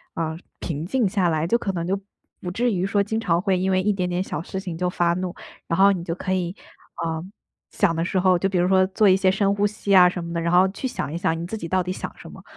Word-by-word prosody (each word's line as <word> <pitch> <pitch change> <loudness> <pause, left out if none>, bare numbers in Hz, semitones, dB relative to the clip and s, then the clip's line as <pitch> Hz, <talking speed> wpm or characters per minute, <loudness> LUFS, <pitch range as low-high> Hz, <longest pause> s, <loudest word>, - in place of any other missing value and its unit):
呃， 160 -1 -2 0.2
平 155 -2 -4
静 245 -2 +1
下 185 -3 +1
来， 155 0 0
就 235 - +2
可 200 -4 -2
能 170 -1 -3
就 195 +1 0 0.4
不 180 - -4
至 240 +5 +1
于 185 0 0
说 200 +1 +1
经 215 +2 -2
常 170 -3 +1
会 190 -2 +1
因 190 +1 0
为 185 0 +2
一 210 +2 +2
点 180 -2 -1
点 175 +1 -1
小 165 - -4
事 190 - -5
情 180 -4 -6
就 180 +1 0
发 175 -1 +1
怒。 185 -1 -3 0.3
然 165 - -1
后 200 +1 +7
你 180 -3 -2
就 165 - -3
可 185 +2 -3
以， 175 -1 -1 0.5
呃， 160 0 -2 0.5
想 175 -5 +1
的 165 - 0
时 185 - 0
候， 185 -1 +4
就 195 - 0
比 185 - -1
如 175 +1 +3
说 190 0 +4
做 200 +2 +2
一 185 - +6
些 190 -1 +3
深 200 0 +1
呼 205 - +1
吸 200 -1 0
啊 180 -1 +8
什 175 -1 -5
么 170 0 -6
的， 170 - -1
然 170 - 0
后 185 +2 +6
去 230 +7 -4
想 150 - -4
一 165 - -3
想 165 -1 0
你 170 - -5
自 220 - -4
己 170 - -6
到 185 +2 +1
底 180 +1 -3
想 - - -5
什 - - -11
么。 - - -13
185 Hz, 315 characters per minute, -23 LUFS, 170-195 Hz, 0.5 s, 啊